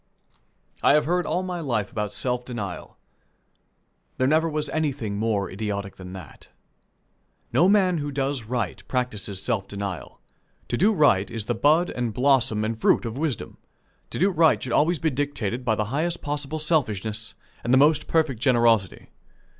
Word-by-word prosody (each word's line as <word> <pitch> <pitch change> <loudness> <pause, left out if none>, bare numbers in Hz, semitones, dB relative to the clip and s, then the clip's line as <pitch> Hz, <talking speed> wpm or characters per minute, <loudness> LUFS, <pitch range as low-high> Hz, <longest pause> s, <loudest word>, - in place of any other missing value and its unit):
I - - +5
have 150 0 +3
heard 180 +3 0
all 180 - 0
my 180 -1 -4
life 115 -10 -2
about 105 -1 -3
self 125 +1 -1
denial. 105 -8 -6 1.2
There 130 - +2
never 160 +4 +3
was 150 -1 -1
anything 140 -9 -2
more 105 -3 0
idiotic 100 0 -4
than 90 -1 -9
that. 90 -6 -11 1.1
No 175 +4 +5
man 185 -4 +3
who 145 0 -3
does 135 -3 -2
right 115 -4 -3
practices 105 -6 -3
self 105 -6 -1
denial. 100 -9 -6 0.5
To - - 0
do 205 +4 +4
right 145 - +3
is 115 -3 -5
the - - 0
bud 160 +5 +3
and 120 -3 -3
blossom 125 -5 +2
and 115 +1 -2
fruit 110 - +2
of 115 0 -4
wisdom. 145 -4 -3 0.5
To - - -6
do 195 +4 +3
right 165 -2 +3
should 125 - -3
always 170 +3 +3
be 160 +1 0
dictated 130 -4 -2
by 115 -3 +1
the 105 - -1
highest 170 +4 -1
possible 145 +1 -3
selfishness 110 - -1 0.3
and 120 - -1
the 130 - +6
most 150 +2 +4
perfect 155 -8 +1
generosity. 115 -6 +2
125 Hz, 165 wpm, -24 LUFS, 110-155 Hz, 1.2 s, the